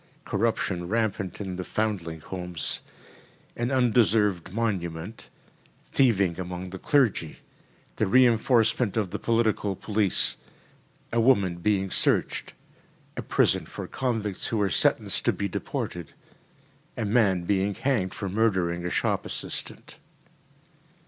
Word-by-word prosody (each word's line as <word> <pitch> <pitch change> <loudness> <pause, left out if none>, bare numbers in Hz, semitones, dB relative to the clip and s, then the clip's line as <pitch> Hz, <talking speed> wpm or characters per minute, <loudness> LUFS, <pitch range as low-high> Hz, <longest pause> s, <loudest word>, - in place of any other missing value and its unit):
Corruption 100 -4 -1
rampant 100 -3 -1
in 95 -3 -4
the 95 - -3
foundling 90 -7 -2
homes. 90 -1 -4 0.8
An 120 +1 -1
undeserved 110 -8 +2
monument. 95 -3 -3 0.6
Thieving 100 -9 +3
among 90 0 -5
the 95 - -7
clergy. 110 - +1 0.6
The - - +1
reinforcement 115 -1 +3
of 100 -5 0
the - - -3
political 110 -3 +1
police. 105 -1 +1 0.8
A 115 - +3
woman 100 -8 +3
being 95 +1 0
searched. - - 0 0.6
A - - -3
prison - - +1
for - - -6
convicts 115 -7 -2
who 115 - -1
are 100 -2 +1
sentenced - - +1
to - - +3
be 100 - -2
deported. 85 -3 -4 0.8
A 115 - -1
man 100 -5 +3
being 100 +1 0
hanged 115 -10 0
for 100 - -4
murdering 95 -4 +1
a 90 - -2
shop - - 0
assistant. - - -6
100 Hz, 120 wpm, -26 LUFS, 90-115 Hz, 0.8 s, Thieving